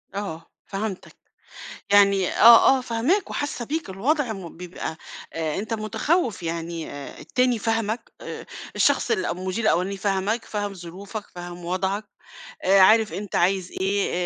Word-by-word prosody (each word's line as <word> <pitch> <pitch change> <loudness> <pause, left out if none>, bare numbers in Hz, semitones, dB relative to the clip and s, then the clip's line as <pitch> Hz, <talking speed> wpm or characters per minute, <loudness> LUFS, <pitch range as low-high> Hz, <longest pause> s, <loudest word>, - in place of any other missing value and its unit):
آه، 165 -5 -5
فهَمتك، 200 -1 -5 0.8
يعني 200 -2 +5
آه، 235 +3 +7
آه، - - -3
فاهماك 250 - 0
وحاسّة 290 -4 -3
بيك، 315 -1 -3
الوضع 245 +6 0
م 180 -6 -9
بيبقى 175 -2 -6 0.4
آآ، 160 -2 -2
أنت 215 +2 -4
مُتخوِّف، 225 - 0
يعني 165 0 -4
آآ، 145 -1 -8
التاني 250 -2 +1
فاهمك 225 +1 -1
آآ، - - -7 0.3
الشخص - - +2
الأو 430 -2 0
المديرالأولاني 190 0 0
فاهمك، 200 +3 -1
فاهم 205 -1 -3
ظروفك، 195 +4 -8
فاهم 175 0 -8
وضْعك، 190 +4 -1 0.6
آآ، 195 +1 +5
عارف 215 +3 +5
أنت 205 -1 -5
عايز 185 0 +1
إيه، 200 +1 +1
200 Hz, 135 wpm, -24 LUFS, 185-225 Hz, 0.8 s, آه